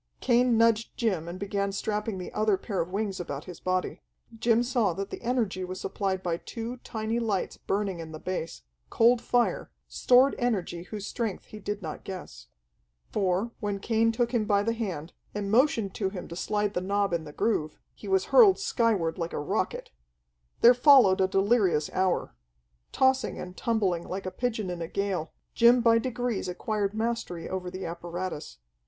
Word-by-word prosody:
Cain 245 -1 +3
nudged 230 0 +2
Jim 190 -9 0
and 175 +1 -6
began 200 0 -1
strapping 210 +1 -2
the 180 - -7
other 215 -2 +2
pair 195 0 -2
of 170 - -4
wings 195 0 -2
about 145 -4 -5
his 180 - -9
body. 185 0 -2 0.3
Jim 230 +1 +2
saw 235 -7 +1
that 195 +3 -5
the - - -6
energy 230 -7 -1
was 185 +1 -5
supplied 190 -1 -2
by 170 -2 -1
two 230 +6 -6
tiny, 225 -1 -3
lights 210 -5 -1
burning 195 -3 -2
in 160 -1 -7
the 155 - -7
base, 165 - -5 0.3
cold 235 +1 +4
fire, 245 -1 +1 0.2
stored 255 +2 +4
energy 195 -8 -1
whose 205 0 -6
strength 220 -5 -3
he 215 - -10
did 205 0 -4
not 155 -2 -6
guess. - - -8 0.6
For, 195 +3 0
when 205 -2 -2
Cain 225 +2 +2
took 235 +1 0
him 235 -4 +1
by 205 -1 +2
the 230 +2 0
hand, 185 -9 -4 0.2
and 200 -1 -2
motioned 225 -5 +3
to 195 -3 -1
him 190 -2 -7
to 170 - -7
slide 210 +2 -1
the 180 - -1
knob 200 0 0
in 170 -1 0
the 150 - -9
groove, 155 -4 -1 0.2
he 210 - -11
was 190 -1 +2
hurled 425 -6 +8
skyward 220 - 0
like 165 0 -3
a - - -2
rocket. 145 - -2 0.7
There 240 - +9
followed 245 -7 +6
a 190 - +4
delirious 195 -5 +2
hour. 185 - 0 0.6
Tossing 265 -3 +2
and 180 0 -7
tumbling 200 -8 0
like 190 +1 -4
a 185 - -3
pigeon 220 -2 -2
in 175 -1 -5
a 165 - -3
gale, 190 -4 -2 0.2
Jim 240 +1 +6
by 230 -1 +4
degrees 245 -3 -2
acquired 205 +2 -2
mastery 220 -6 -2
over 185 -1 -4
the 185 0 -6
apparatus. 170 - -5
200 Hz, 180 wpm, -28 LUFS, 185-230 Hz, 0.7 s, There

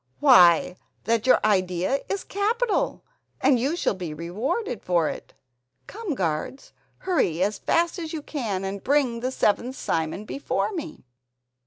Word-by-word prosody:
Why, 180 - +6 0.3
that 230 +2 0
your 255 - +6
idea 185 +4 +1
is 395 -1 -2
capital, 440 +3 -1 0.4
and 255 -4 +3
you 275 +7 0
shall 350 - 0
be 175 -5 -6
rewarded 215 - -3
for 170 -3 +1
it. - - -9 0.5
Come, 410 -8 -5
guards, 170 - -3 0.2
hurry 185 - 0
as 205 +1 -1
fast 340 +2 +1
as 325 -2 -5
you 310 -3 -5
can 220 -12 -3
and 195 0 -5
bring 265 -4 +1
the 250 +2 -2
seventh 255 0 0
Simon 165 +3 -2
before 280 - -2
me." 320 - -7
240 Hz, 145 wpm, -25 LUFS, -, 0.5 s, Why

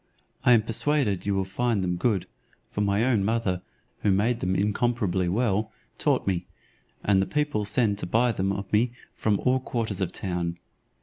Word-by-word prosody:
I 125 - +6
am 110 -2 +5
persuaded 115 -3 0
you 100 - +2
will 95 -1 0
find 110 +1 0
them 90 -1 0
good; 100 0 +1 0.5
for 105 - -2
my 100 +2 +2
own 120 -6 +2
mother, 100 -4 0 0.4
who - - +1
made 110 +5 +2
them 95 -2 0
incomparably 100 -3 +1
well, 110 +1 +1 0.3
taught - - +1
me, 95 -3 -1 0.6
and 100 -2 +3
the 95 - -1
people 150 -8 0
send 105 0 +1
to - - -4
buy 120 +6 +3
them 95 -2 -1
of 100 0 -5
me 115 +3 +3 0.2
from 105 -2 0
all 130 0 +3
quarters 115 -6 -3
of 90 -2 0
the - - -9
town." 85 -2 -2
105 Hz, 185 wpm, -26 LUFS, 95-115 Hz, 0.6 s, I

